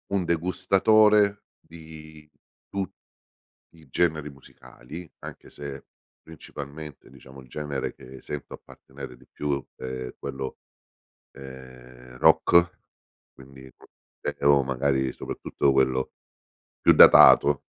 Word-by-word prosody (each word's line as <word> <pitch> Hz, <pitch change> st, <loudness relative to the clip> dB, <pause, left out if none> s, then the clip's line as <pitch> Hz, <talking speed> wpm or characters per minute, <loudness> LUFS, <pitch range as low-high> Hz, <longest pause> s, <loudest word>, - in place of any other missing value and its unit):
Un 95 Hz, -3 st, 0 dB
degustatore 100 Hz, +4 st, +3 dB
di 80 Hz, -2 st, -14 dB, 0.4 s
tu 100 Hz, -1 st, -3 dB, 0.9 s
i 80 Hz, -2 st, -19 dB
generi 80 Hz, -2 st, 0 dB
musicali, 70 Hz, +3 st, -13 dB
anche -, -, -11 dB
se, 70 Hz, -2 st, -9 dB, 0.4 s
principalmente, 75 Hz, -2 st, -11 dB
diciamo, 65 Hz, 0 st, -15 dB
il 65 Hz, -, -19 dB
genere 75 Hz, 0 st, -4 dB
che 65 Hz, +1 st, -14 dB
sento 75 Hz, -2 st, -7 dB
appartenere 60 Hz, -, -12 dB
di -, -, -22 dB
più, 70 Hz, -2 st, -3 dB
è 65 Hz, -1 st, -7 dB
quello, 65 Hz, -1 st, -6 dB, 0.8 s
ehm, 65 Hz, -2 st, -13 dB
rock 85 Hz, +6 st, +4 dB, 0.6 s
quindi 65 Hz, 0 st, -15 dB, 0.7 s
o 70 Hz, -1 st, +4 dB
magari, 65 Hz, 0 st, -1 dB
soprattutto, 70 Hz, -, -2 dB
quello 65 Hz, -1 st, +1 dB, 0.7 s
più -, -, +5 dB
datato, 70 Hz, -1 st, +7 dB
70 Hz, 100 wpm, -25 LUFS, 65-80 Hz, 0.9 s, datato